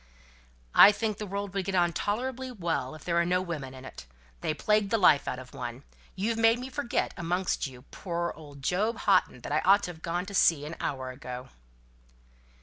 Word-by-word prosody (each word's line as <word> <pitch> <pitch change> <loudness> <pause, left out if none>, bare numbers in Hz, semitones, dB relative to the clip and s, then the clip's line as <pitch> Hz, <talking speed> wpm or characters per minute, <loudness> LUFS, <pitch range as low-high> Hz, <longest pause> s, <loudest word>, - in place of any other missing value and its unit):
"I 205 - +10
think 215 0 -2
the 210 - -4
world 200 0 -4
would 195 -2 -2
get 195 - -2
on 175 -1 +3
tolerably 255 +7 -2
well, 165 - -2
if 155 - -12
there 175 - -2
were 170 0 +4
no 180 +1 +2
women 155 -8 -5
in 130 0 -11
it. 65 - -10 0.3
They - - -1
plague 210 +3 +2
the 225 - +2
life 165 -8 +5
out 125 - -2
of 130 0 -11
one. 120 +2 -6 0.3
You've 220 +4 -1
made 225 +1 +5
me 255 +2 -6
forget, 235 -2 -1
amongst 175 -2 -1
you 125 -2 -12
poor 170 -2 -3
old 145 -3 -13
Job 210 - 0
Houghton 125 - +3
that - - -7
I 150 - +3
ought 200 +4 +5
to 180 - -3
have 160 -2 -15
gone 175 +2 -2
to 200 - -9
see 160 -6 +4
an 160 +2 -6
hour 130 -2 -3
ago." 125 0 -8
175 Hz, 210 wpm, -28 LUFS, 145-205 Hz, 0.3 s, I